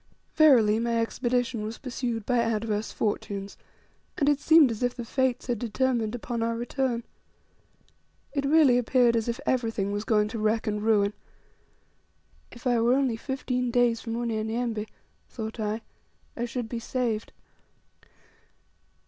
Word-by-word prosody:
Verily, 235 -9 +5
my 235 0 0
expedition 240 0 -1
was 220 +2 -5
pursued 240 -4 -4
by 245 -2 +2
adverse 220 -2 -1
fortunes, 200 -2 -3 0.6
and 280 - +1
it 290 -1 +3
seemed 315 -4 +6
as 220 - -5
if 245 0 0
the 240 - -6
Fates 260 +1 0
had 245 -4 -2
determined 240 -1 0
upon 240 -1 -4
our 230 0 0
return. 240 0 -1 1.3
It 280 -1 -1
really 280 -4 +5
appeared 245 0 +3
as 225 0 0
if 235 0 -2
everything 225 -5 0
was 205 +1 -2
going 210 -1 +2
to 225 0 -5
wreck 215 +1 +1
and 210 -1 -1
ruin. 210 -2 +2 1.4
If 240 - -14
I 240 -2 +2
were 240 +2 +4
only 265 -4 +1
fifteen 250 0 -2
days 240 -1 +2
from 230 -1 -4
Unyanyembe, 225 -1 -2 0.4
thought 220 -1 -6
I, 215 +1 -2 0.5
I 240 - -2
should 245 -1 -4
be 235 +1 -4
saved! 230 -2 -2
235 Hz, 145 wpm, -27 LUFS, 220-250 Hz, 1.4 s, seemed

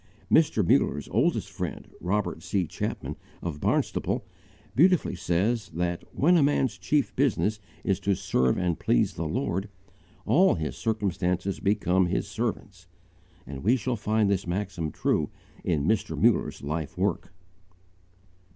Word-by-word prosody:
Mr. 110 - +4
Muller's 75 -1 +2
oldest - - +1
friend, - - -5
Robert 105 +4 -1
C. 95 -3 0
Chapman - - -4 0.3
of 80 -4 -4
Barnstaple, - - 0 0.5
beautifully 180 +5 +4
says 100 +6 0
that 85 0 -1
"when 175 +5 +4
a - - +4
man's 140 -3 +1
chief 145 -2 0
business 115 -5 +1 0.2
is 95 -2 +1
to 100 -1 +1
serve 85 -10 +1
and 90 -3 0
please - - +2
the 80 - -3
Lord, 100 - -2 0.6
all 160 - +4
his 80 -3 -3
circumstances 95 -4 -1
become 95 -3 +2
his 95 - -1
servants"; 100 -4 -4 0.6
and 70 -1 -7
we 115 +6 +4
shall 125 0 -1
find 110 0 +1
this 100 -2 0
maxim 90 -3 -2
true - - 0 0.3
in 75 -2 0
Mr. 110 +3 0
Muller's - - +2
life 75 +1 -4
work. - - -1
100 Hz, 135 wpm, -27 LUFS, 85-110 Hz, 0.6 s, Mr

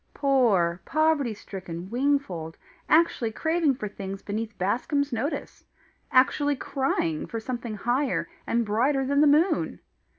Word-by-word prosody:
Poor, 210 - +2
poverty 310 -6 +1
stricken 185 -2 -8
Wingfold! 240 - -1 0.3
actually 310 -8 +3
craving 320 +3 +1
for 215 -4 -4
things 195 -1 -7
beneath 220 +1 -4
Bascombe's 265 - 0
notice! 255 +7 -3 0.5
actually 285 +3 +3
crying 260 - -1
for 230 - -4
something 235 -1 -5
higher 250 +6 0 0.2
and 235 0 +1
brighter 260 +6 +1
than 280 +2 +2
the 300 - +6
moon! 310 +6 +2
245 Hz, 125 wpm, -26 LUFS, 205-285 Hz, 0.5 s, the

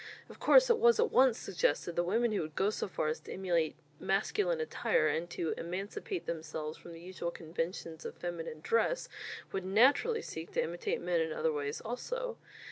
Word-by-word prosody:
Of - - -12
course - - +7
it 460 - +3
was 470 0 +5
at 470 - +3
once 260 -3 +5
suggested 170 -2 0
that 175 - +2
women 230 +5 +2
who 210 - 0
would 155 -1 -6
go 200 +2 +2
so - - -3
far 155 -4 -1
as 155 - -2
to - - -11
imitate 175 -4 0 0.2
masculine 480 +4 +1
attire 470 +1 +1
and 170 +2 -1
to 170 -1 -2
emancipate 205 - -4
themselves 155 -1 -4
from 170 - -11
the 165 - -10
usual 175 0 -4
conventions 165 0 -5
of - - -6
feminine 165 -3 -5
dress, 230 - +1 0.4
would 190 - -2
naturally 260 - +4
seek 160 +1 -7
to - - +2
imitate 175 +2 -2
men 175 -1 +1
in 160 0 -1
other 160 0 0
ways 145 0 -3
also. 480 - -4
180 Hz, 190 wpm, -33 LUFS, 165-260 Hz, 0.4 s, course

